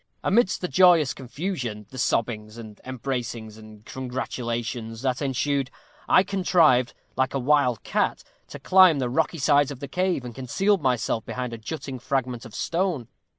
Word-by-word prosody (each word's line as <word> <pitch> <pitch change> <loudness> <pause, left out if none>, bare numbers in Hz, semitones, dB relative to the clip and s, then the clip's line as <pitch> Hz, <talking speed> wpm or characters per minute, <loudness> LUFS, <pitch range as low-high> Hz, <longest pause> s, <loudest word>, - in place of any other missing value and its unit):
Amidst 200 0 +2
the 180 - -1
joyous 175 -6 +5
confusion 125 - -5
the 130 - -8
sobbings, 110 -2 -1
and 110 -3 -11
embracings, 120 -4 -4
and 110 -1 -14
congratulations 120 -3 -4
that 130 0 0
ensued 140 0 0 0.4
I 185 - +6
contrived, 175 -10 +3 0.2
like 130 +1 0
a - - +1
wild 130 -3 +2
cat, - - -1 0.2
to - - -9
climb 185 -4 +6
the 125 -3 -1
rocky 160 +4 0
sides 145 -1 +3
of 140 -3 -7
the 140 - -6
cave, 180 -3 -1
and 120 - -7
concealed 190 - 0
myself 120 -4 0
behind 125 -2 -5
a 115 - -6
jutting 135 +1 -6
fragment 130 -1 -2
of 115 - -11
stone. 170 - -1
130 Hz, 155 wpm, -25 LUFS, 120-155 Hz, 0.4 s, I